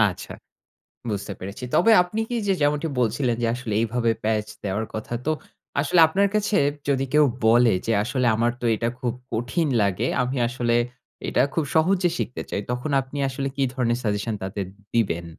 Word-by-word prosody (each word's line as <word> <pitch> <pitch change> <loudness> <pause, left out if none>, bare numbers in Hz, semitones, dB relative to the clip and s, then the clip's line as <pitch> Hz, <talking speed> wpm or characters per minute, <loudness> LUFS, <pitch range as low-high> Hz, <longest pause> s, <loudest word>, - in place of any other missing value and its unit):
আচ্ছা, 105 -4 0 0.8
বুঝতে 100 -1 -3
পেরেছি। 100 +7 -7
তবে 230 - +5
আপনি 215 +5 -4
কি 240 - -1
যে - - +5
যেমনটি 150 +2 +1
বলছিলেন 120 +1 +1
যে - - +2
আসলে 120 -3 -5
এইভাবে 115 0 +1
প্যাচ 110 -1 +1 0.2
দেওয়ার 100 +3 -1
কথা, 110 +2 -4
তো - - +2 0.5
আসলে 170 +4 +3
আপনার 200 +5 +2
কাছে 210 -1 +1 0.3
যদি 135 -1 +2
কেউ 150 0 +6 0.2
বলে 120 0 +5
যে 115 - +1
আসলে 125 +1 0
"আমার 120 +1 +2
তো - - -6
এটা 115 +1 -1
খুব 120 -2 -1 0.2
কঠিন 125 +8 0
লাগে। 100 +4 0 0.2
আমি 125 +2 -2
আসলে 120 -1 0 0.5
এটা - - +3
খুব 165 - +1
সহজে 180 +3 +3
শিখতে 125 - -3
চাই।" 100 - -1
তখন 125 +4 -2
আপনি 135 +2 -7
আসলে 135 +1 -3
কি 140 - 0
ধরনের 120 -2 +1
সাজেশন 105 +1 -1
তাদের 95 0 -3 0.3
দিবেন? 95 -7 +1
120 Hz, 175 wpm, -24 LUFS, 110-145 Hz, 0.8 s, কেউ